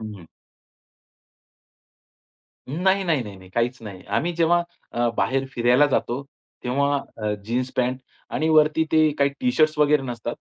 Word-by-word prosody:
हं. 105 -6 -9 2.4
नाही, 190 +7 +1
नाही, 160 -7 +1
नाही, 100 -2 -9
नाही, 95 -1 -15
काहीच 120 +4 -1
नाही. 100 -4 -9
आम्ही 175 - 0
जेव्हा 170 +1 +3 0.3
अ, 120 0 +1
बाहेर 135 +1 +1
फिरायला 120 +4 +4
जातो, 130 -1 -1 0.4
तेव्हा 140 +3 +1 0.2
अ, 105 -1 -1
जीन्स 125 +3 -1
पॅन्ट 125 +1 0 0.3
आणि 160 +1 0
वरती 155 0 +4
ते 155 -1 +5
काही 140 0 +3
टी-शर्ट्स 155 -12 +2
वगैरे 150 -2 +4
नसतात. 120 -3 -5
135 Hz, 135 wpm, -23 LUFS, 120-155 Hz, 2.4 s, ते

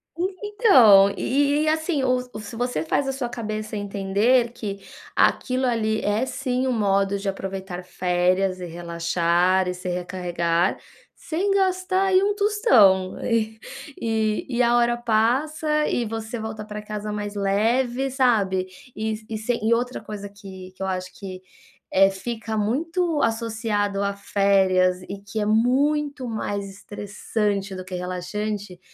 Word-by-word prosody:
E 370 +3 -2
então, 255 - +7
e 285 +6 +1
e 300 - +2
e, - - -1
assim, 315 -2 0
o 255 -1 +3 0.2
o - - -6
se 215 +1 -8
você 245 -8 -1
faz 270 - 0
a - - +1
sua 265 -2 -3
cabeça 215 -2 -5
entender 205 +5 +1
que 200 -4 -6 0.4
aquilo 255 0 +2
ali 220 -3 0
é, 210 +5 0
sim, 255 -1 -2
um - - +1
modo 200 -3 +1
de 200 - -5
aproveitar 190 -2 -5
férias, 180 +1 0
e 180 - -5
relaxar 170 +2 +1
e 180 - -1
se 180 0 -6
recarregar 175 -1 -1 0.4
sem 370 +5 -1
gastar 375 -1 +1
aí 380 -1 +4
um 410 +1 +2
tostão. 245 - +4
E 220 -1 0 0.4
e 220 -2 0
e 250 - +4
a 240 0 +3
hora 240 0 +2
passa 275 +7 +1
e 240 - 0
você 225 +1 -5
volta 220 -1 -5
para 210 0 -6
casa 210 0 -5
mais 205 0 -4
leve, 235 +6 +1
sabe. 215 -8 +2 0.3
E 220 0 -2 0.2
s 220 +3 -1
e 220 +2 +3
outra 245 +2 -1
coisa 205 -1 -7
que 190 -2 -11
que - - -14
eu 190 - -1
acho 185 -1 -3
que, 185 -2 -8 0.5
eh, 195 +1 +5
fica 220 +3 -5
muito 320 - 0
associada 220 -3 -1
a 200 - -2
férias 190 -2 +2
e 195 +2 -7
que 205 +2 -5
é 210 - 0
muito 270 +5 +1
mais 205 -3 -3
estressante 205 0 -3
do 185 - -6
que 185 0 -6
relaxante 185 +2 -4
215 Hz, 155 wpm, -23 LUFS, 195-250 Hz, 0.5 s, então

